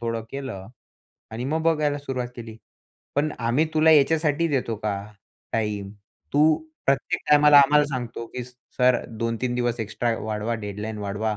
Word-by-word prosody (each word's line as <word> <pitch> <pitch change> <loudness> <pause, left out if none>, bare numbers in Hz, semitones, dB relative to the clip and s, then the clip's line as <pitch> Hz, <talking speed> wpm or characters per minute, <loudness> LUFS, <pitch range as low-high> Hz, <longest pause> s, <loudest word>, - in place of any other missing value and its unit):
थोडं 115 -1 -2
केलं 130 -9 -6 0.7
आणि 115 +2 -4
मग 155 +4 -1
बघायला 150 -3 +1
सुरुवात 130 -3 -4
केली." 115 -2 -8 0.6
पण 150 +2 +1
आम्ही 120 +6 +2
तुला 155 +1 +5
याच्यासाठी 155 +1 +3
देतो 130 -6 -1
का 105 -1 -2 0.6
टाईम? 105 -3 -2 0.4
तू 155 +2 +5 0.3
प्रत्येक 135 -2 +1
टाईमाला 150 0 +8
आम्हाला 150 +2 +5
सांगतो 120 -4 -5
की 125 - -3
सर 125 0 0
2-3 115 +2 -1
दिवस 120 -1 -1
एक्स्ट्रा 115 +2 -1
वाढवा, 110 +1 -2
डेडलाईन 105 0 -5
वाढवा. 105 +1 -2
125 Hz, 145 wpm, -24 LUFS, 110-145 Hz, 0.7 s, टाईमाला